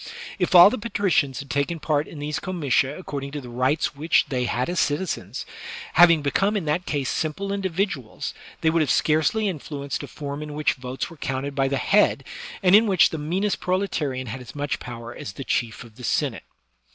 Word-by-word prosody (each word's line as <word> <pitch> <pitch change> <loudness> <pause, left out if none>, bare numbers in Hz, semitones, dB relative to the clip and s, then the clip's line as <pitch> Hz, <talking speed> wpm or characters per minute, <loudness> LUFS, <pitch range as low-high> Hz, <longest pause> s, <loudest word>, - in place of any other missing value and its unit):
If 180 0 +1
all 175 +3 +10
the 255 - -3
patricians 195 - 0
had 140 - -9
taken 145 +4 -1
part 150 -1 0
in 160 - -10
these 145 +1 -3
comitia 145 -7 0
according 140 -6 -5
to 150 - -3
the 125 -3 -10
rights 130 +5 0
which 155 +4 +3
they 125 -2 0
had 120 +1 -1
as 175 0 -1
citizens, 150 +6 -2 0.5
having 170 -3 +6
become 195 +9 +1
in 185 - -3
that 155 +4 -1
case 140 -3 -1
simple 195 +9 -2
individuals, 190 - -2 0.3
they 160 - +3
would 165 0 +2
have 150 - +1
scarcely 160 +8 +2
influenced 145 -5 -4
a 145 - -7
form 140 +2 -6
in 150 -1 -6
which 150 -1 +1
votes 130 +4 -5
were 165 - -12
counted 135 0 -3
by 135 -1 +1
the 140 0 0
head, - - +3 0.4
and 185 +1 +7
in 220 +2 +6
which 190 -4 +5
the 160 - -4
meanest 185 +7 -1
proletarian 160 -9 -1
had 125 +3 -6
as 125 +2 -11
much 145 -1 -2
power 120 0 -8
as 100 - -7
the 135 - -7
Chief 120 -3 -1
of 115 -2 -16
the 125 - -11
Senate. - - -1
150 Hz, 200 wpm, -24 LUFS, 135-180 Hz, 0.5 s, all